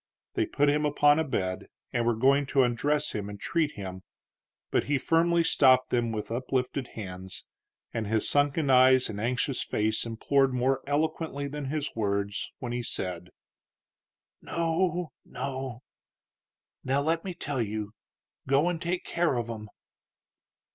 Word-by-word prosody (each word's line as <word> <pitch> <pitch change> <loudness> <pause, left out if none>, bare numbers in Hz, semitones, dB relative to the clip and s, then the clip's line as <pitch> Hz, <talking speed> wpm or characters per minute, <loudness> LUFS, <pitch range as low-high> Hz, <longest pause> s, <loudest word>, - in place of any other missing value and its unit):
They 345 -3 0
put 145 - +1
him 150 +1 +2
upon 145 0 +4
a - - +2
bed, 95 -10 -2 0.3
and 120 -1 +1
were 120 - +3
going 135 +4 +3
to 135 -1 +3
undress 145 +5 +1
him 105 -1 -4
and 100 0 -8
treat 155 +5 0
him, 95 -2 -7 0.7
but - - +2
he 145 0 +1
firmly 170 +3 +3
stopped 130 -5 +4
them 120 -2 +1
with 110 0 -4
uplifted 130 +1 -1
hand, 95 -3 -6 0.6
and 110 -2 -2
his 110 0 +2
sunken 145 0 +2
eyes 130 0 +6
and 105 -1 -5
anxious 125 +3 0
face 110 +1 0
implored 130 +4 +1
more 130 +2 +1
eloquently 150 -1 -1
than 145 0 -5
his 150 +2 -3
words, 100 -2 -1
when 120 -2 -5
he 120 0 -2
said: 90 -6 -4 1.1
"No, 170 0 -1
no! 130 -2 -5 1.0
Now, 135 +2 +1
let 165 +2 0
me 185 -2 -5
tell 145 -6 -2
you: 105 -1 -3 0.6
Go 140 +5 +3
an' 170 - -4
take 175 +2 -2
care 170 -5 +1
of 120 -1 -2
'em." 110 -2 -7
130 Hz, 150 wpm, -28 LUFS, 115-150 Hz, 1.1 s, eyes